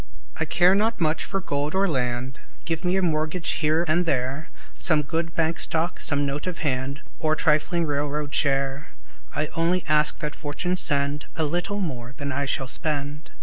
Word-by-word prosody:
I -, -, +2 dB
care 180 Hz, +1 st, +5 dB
not 220 Hz, +2 st, +1 dB
much 155 Hz, -1 st, +1 dB
for 195 Hz, -, -2 dB
gold 145 Hz, -3 st, -2 dB
or 195 Hz, +1 st, +3 dB
land; 125 Hz, -3 st, -1 dB, 0.3 s
Give 165 Hz, +1 st, -2 dB
me 180 Hz, +1 st, +2 dB
a 190 Hz, -, +2 dB
mortgage 160 Hz, +1 st, 0 dB
here 155 Hz, +2 st, +2 dB
and 170 Hz, +2 st, +2 dB
there, 135 Hz, +2 st, -1 dB, 0.2 s
Some 155 Hz, -4 st, +3 dB
good 165 Hz, +3 st, -2 dB
bank 165 Hz, 0 st, +1 dB
stock, 165 Hz, +2 st, 0 dB
some 145 Hz, -1 st, +1 dB
note 140 Hz, +4 st, -3 dB
of 170 Hz, -3 st, -4 dB
hand, 135 Hz, +1 st, -1 dB, 0.2 s
Or 155 Hz, -1 st, +2 dB
trifling 160 Hz, +2 st, +2 dB
railroad 145 Hz, 0 st, -2 dB
share, 135 Hz, 0 st, +1 dB, 0.5 s
I 150 Hz, +1 st, 0 dB
only 170 Hz, +2 st, +2 dB
ask 150 Hz, 0 st, +3 dB
that 150 Hz, 0 st, -4 dB
Fortune 160 Hz, +5 st, -2 dB
send 145 Hz, -3 st, 0 dB
A 160 Hz, -, 0 dB
little 175 Hz, +6 st, -1 dB
more 130 Hz, -9 st, -4 dB
than 140 Hz, 0 st, -4 dB
I 140 Hz, +1 st, -1 dB
shall 135 Hz, -1 st, -1 dB
spend. 145 Hz, +1 st, -1 dB
155 Hz, 180 wpm, -25 LUFS, 140-170 Hz, 0.5 s, care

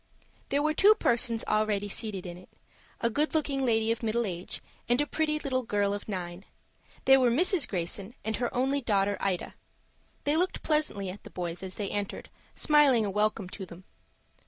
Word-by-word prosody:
There 285 Hz, +1 st, +1 dB
were 310 Hz, 0 st, +2 dB
two 410 Hz, +7 st, +6 dB
persons 230 Hz, -, +1 dB
already 215 Hz, -1 st, +1 dB
seated 205 Hz, -3 st, -2 dB
in 175 Hz, -1 st, -6 dB
it,—a 185 Hz, +5 st, -7 dB
good 300 Hz, +7 st, 0 dB
looking 280 Hz, -3 st, 0 dB
lady 225 Hz, -2 st, +2 dB
of 230 Hz, -, -2 dB
middle 230 Hz, +1 st, 0 dB
age, 180 Hz, -2 st, -5 dB, 0.3 s
and 245 Hz, +2 st, +3 dB
a 295 Hz, -, +3 dB
pretty 305 Hz, 0 st, 0 dB
little 265 Hz, -3 st, -1 dB
girl 205 Hz, -4 st, 0 dB
of 205 Hz, -, -5 dB
nine. 180 Hz, -2 st, -5 dB, 0.6 s
They 270 Hz, 0 st, +8 dB
were 255 Hz, -2 st, +4 dB
Mrs. 320 Hz, -, +3 dB
Greyson 195 Hz, +4 st, -4 dB
and 220 Hz, -1 st, -1 dB
her 245 Hz, -1 st, -1 dB
only 270 Hz, +3 st, +1 dB
daughter 205 Hz, -4 st, +1 dB
Ida. 190 Hz, -3 st, -2 dB, 0.7 s
They 290 Hz, +1 st, +1 dB
looked 365 Hz, +2 st, 0 dB
pleasantly 300 Hz, -, 0 dB
at 200 Hz, -, -11 dB
the -, -, -10 dB
boys 175 Hz, -1 st, -5 dB
as 190 Hz, -1 st, -6 dB
they 205 Hz, -2 st, -3 dB
entered, 205 Hz, -1 st, -4 dB, 0.2 s
smiling 290 Hz, -7 st, +4 dB
a 200 Hz, -, -2 dB
welcome 210 Hz, -1 st, 0 dB
to 195 Hz, -, -7 dB
them. 180 Hz, 0 st, -11 dB
220 Hz, 180 wpm, -29 LUFS, 195-270 Hz, 0.7 s, They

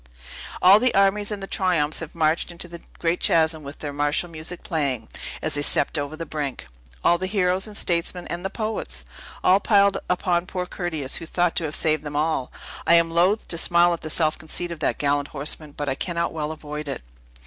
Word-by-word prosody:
All 190 Hz, +3 st, +9 dB
the 250 Hz, +1 st, +2 dB
armies 200 Hz, +1 st, +3 dB
and 205 Hz, -2 st, -3 dB
the -, -, -2 dB
triumphs 175 Hz, -6 st, +1 dB
have 165 Hz, -1 st, -8 dB
marched 160 Hz, +1 st, +1 dB
into 175 Hz, 0 st, -2 dB
the 170 Hz, 0 st, -10 dB, 0.2 s
great 170 Hz, +1 st, 0 dB
chasm, 160 Hz, -1 st, +2 dB
with 140 Hz, 0 st, -8 dB
their 145 Hz, -2 st, -5 dB
martial 145 Hz, +4 st, +1 dB
music 165 Hz, +2 st, -7 dB
playing, 135 Hz, -8 st, -1 dB, 0.4 s
as 155 Hz, -, 0 dB
they 145 Hz, -, +2 dB
stepped 145 Hz, -, +2 dB
over 145 Hz, 0 st, -2 dB
the 165 Hz, -, -4 dB
brink. 145 Hz, -4 st, -4 dB, 0.4 s
All 175 Hz, -, +4 dB
the 185 Hz, -, -2 dB
heroes, 185 Hz, -1 st, +1 dB
the 210 Hz, -, -8 dB
statesmen, 175 Hz, -1 st, 0 dB
and 175 Hz, +1 st, -4 dB
the 195 Hz, -, -1 dB
poets! 210 Hz, -, -4 dB, 0.4 s
All 185 Hz, +2 st, +6 dB
piled 200 Hz, -2 st, +4 dB
upon 180 Hz, -1 st, +1 dB
poor 180 Hz, -1 st, -3 dB
Curtius, 160 Hz, -7 st, -3 dB
who 165 Hz, -, -7 dB
thought 175 Hz, 0 st, +1 dB
to 165 Hz, -, +2 dB
have 150 Hz, -, -2 dB
saved 155 Hz, -2 st, +1 dB
them 145 Hz, -1 st, -6 dB
all! 150 Hz, -3 st, 0 dB, 0.4 s
I 170 Hz, -, +7 dB
am 165 Hz, 0 st, +4 dB
loath 180 Hz, +6 st, +2 dB
to 170 Hz, -, -2 dB
smile 175 Hz, 0 st, +4 dB
at 170 Hz, -, -5 dB
the 155 Hz, -, -5 dB
self 155 Hz, 0 st, +1 dB
conceit 170 Hz, +2 st, -4 dB
of 170 Hz, -, -6 dB
that -, -, 0 dB
gallant 145 Hz, 0 st, +1 dB
horseman, 150 Hz, +1 st, -6 dB
but 140 Hz, -2 st, -3 dB
cannot 170 Hz, -2 st, -1 dB
well 155 Hz, -1 st, -2 dB
avoid 150 Hz, -1 st, -6 dB
it." 135 Hz, -, -4 dB
165 Hz, 210 wpm, -24 LUFS, 150-180 Hz, 0.4 s, All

